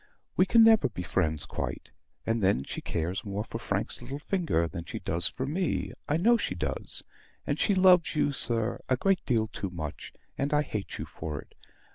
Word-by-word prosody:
We 185 - +4
can 230 +3 +7
never 220 - +6
be 90 -6 -6
friends 80 -3 0
quite; - - -5 0.3
and 115 0 0
then, 95 -8 +2
she - - -6
cares 85 +3 -2
more 100 +1 -3
for 115 0 -6
Frank's 100 -1 -2
little 135 +3 -6
finger 155 - 0
than 85 0 -6
she - - -6
does 85 -1 +1
for 130 - -4
me 170 +6 -1 0.2
I 150 - +3
know 235 +8 +5
she - - -2
does: - - -3 0.4
and - - -1
she 205 - +3
loves 185 -3 +5
you, 145 -1 +2
sir, 115 -3 +3
a 130 - +3
great 195 +5 +2
deal 115 -4 +2
too 100 -3 -5
much; 80 -5 -6 0.3
and 140 +2 +1
I 150 - +3
hate 105 -8 -5
you - - -4
for 75 -3 -6
it. - - -13
115 Hz, 200 wpm, -29 LUFS, -, 0.4 s, can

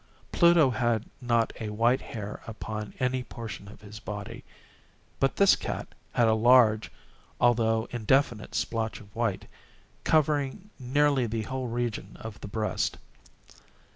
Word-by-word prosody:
Pluto 170 -6 +5
had 120 -1 0 0.2
not 120 -2 +1
a 110 - -4
white 115 +4 +2
hair 105 -2 -7
upon 110 -1 -6
any 130 0 0
portion 115 -4 -8
of 100 - -13
his 105 0 -10
body; 105 -2 -7 0.8
but 135 - +2
this 200 -1 +6
cat - - -5 0.2
had 120 -2 +4
a 110 - +4
large, 110 -1 +5 0.5
although 115 -1 +3
indefinite 120 -1 +1
splotch 115 -1 -2
of 100 -1 -17
white, 115 -4 -1 0.6
covering 155 +5 +1
nearly 135 0 +2
the 110 0 -2
whole 130 +2 -4
region 120 -1 -3
of 110 -2 -8
the - - -6
breast. 110 +1 -1
115 Hz, 135 wpm, -28 LUFS, 110-130 Hz, 0.8 s, this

